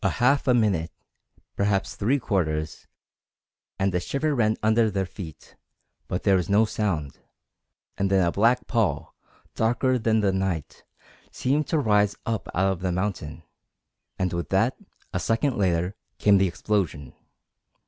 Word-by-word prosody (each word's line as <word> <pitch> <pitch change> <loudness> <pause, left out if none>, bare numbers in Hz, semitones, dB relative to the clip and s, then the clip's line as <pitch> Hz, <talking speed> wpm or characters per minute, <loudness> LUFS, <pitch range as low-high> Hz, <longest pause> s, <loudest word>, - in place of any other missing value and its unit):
A - - +3
half 135 +4 +3
a 125 - +5
minute 95 -8 +1 0.7
perhaps 100 -1 0
three 120 +8 +1
quarters 80 - -2 0.9
and 95 0 0
a 90 - +1
shiver 145 - -1
ran 110 -4 +1
under 110 +1 +3
their 95 -2 -1
feet, 85 -4 -10 0.5
but 90 - -3
there 100 -2 +4
was 90 - -2
no 105 +3 +4
sound; 90 -10 -2 0.8
and 100 0 +1
then 95 -2 +3
a 85 - +1
black 115 +6 +2
pall, 115 -4 -1 0.4
darker 125 +3 +1
than 110 -1 +2
the 100 -2 +2
night, 95 -5 -3 0.5
seemed 140 +3 0
to 160 - +1
rise 105 -6 +2
up 115 -2 -3
out 95 +1 +2
of 95 - -4
the 90 0 -1
mountain, 90 -4 -3 0.7
and 95 -2 -1
with 85 0 -3
that, - - +2 0.4
a - - 0
second 120 +4 0
later, 90 -1 0 0.2
came 100 -2 +4
the 95 - +3
explosion. 85 -8 -2
100 Hz, 150 wpm, -25 LUFS, 90-115 Hz, 0.9 s, a